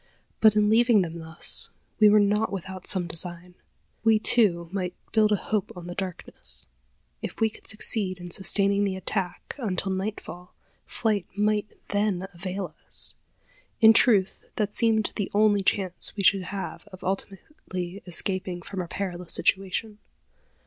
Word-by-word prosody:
But 220 -1 +6
in 210 0 +3
leaving 225 -1 +4
them 170 -1 -6
thus, 160 0 +3 0.3
we 215 -1 +7
were 210 +1 +6
not 210 +2 +2
without 190 -1 -6
some 185 -3 +3
design. 175 +2 -5 0.5
We, 225 -1 +5
too, 200 -6 +2
might 180 -2 -3 0.2
build 215 -1 +3
a - - +5
hope 205 0 -2
on 175 -1 -9
the 175 - -6
darkness. 165 - +1 0.6
If - - -6
we 220 -1 +2
could - - -11
succeed 205 -3 +1
in 175 0 -9
sustaining 200 +2 +1
the 195 -2 -1
attack 190 -1 -3
until 195 -5 -2
nightfall, 190 -2 -5 0.3
flight 210 -5 -1
might 210 0 +1 0.2
then 205 -2 0
avail 185 -1 -5
us. - - -1 0.7
In 225 0 +8
truth, 205 -5 +3
that 210 -2 -1
seemed 225 -2 +2
the 205 - -2
only 205 -1 +4
chance 190 -2 -1
we 200 - -3
should 185 0 +4
have 200 0 -6
of 185 - -13
ultimately 190 - -5
escaping 180 0 -2
from 190 +1 -5
our 175 - -6
perilous 180 -2 -3
situation. 205 +2 0
195 Hz, 150 wpm, -26 LUFS, 180-210 Hz, 0.7 s, In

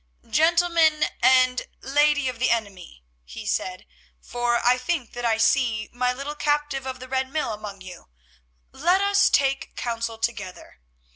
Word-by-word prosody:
"Gentlemen 330 -2 +3 0.2
and 255 0 +4
lady 290 0 +2
of 250 -2 -4
the 255 - +2
enemy," 195 - -3 0.2
he - - -10
said, 185 0 -3 0.3
"for 240 - -1
I 250 +1 +4
think 260 -2 -3
that 245 0 -5
I 225 -1 +2
see 225 -2 +1
my 250 +1 0
little 275 +4 -5
captive 295 -2 -1
of 260 0 -5
the 255 - -9
Red 260 0 -1
Mill 300 -7 -2
among 210 -2 -8
you, 180 - -12 0.6
let 350 +7 +2
us 400 0 +3
take 275 -1 0
counsel 230 -1 -3
together. 215 - -5
255 Hz, 150 wpm, -24 LUFS, 225-295 Hz, 0.6 s, and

